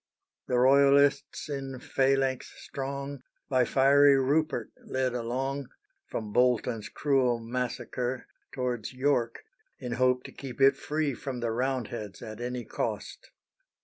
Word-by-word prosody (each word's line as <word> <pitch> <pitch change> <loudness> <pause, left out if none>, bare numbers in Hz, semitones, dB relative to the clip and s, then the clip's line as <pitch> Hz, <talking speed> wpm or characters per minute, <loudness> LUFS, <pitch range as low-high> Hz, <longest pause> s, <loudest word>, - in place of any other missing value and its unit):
The 125 - +1
Royalists 140 +2 +4
in 135 -2 -4
phalanx 135 -1 +1
strong, 140 0 -5 0.3
By 130 -2 +3
fiery 140 +2 +5
Rupert 145 +4 +1
led 130 -1 -1
along, 130 +3 -2 0.4
From 105 -2 -5
Bolton's 125 -3 +2
cruel 130 -4 +2
massacre 125 +1 -3 0.3
Towards 125 -4 -3
York, 125 -3 0 0.3
in 125 - -6
hope 125 +1 +2
to - - -9
keep 135 -3 -9
it 135 0 +6
free 150 -2 -1
From 130 0 -5
the 120 -1 -1
Roundheads 120 -4 -3
at 110 +1 -8
any 125 0 -4
cost. - - -4
130 Hz, 120 wpm, -29 LUFS, 120-135 Hz, 0.4 s, it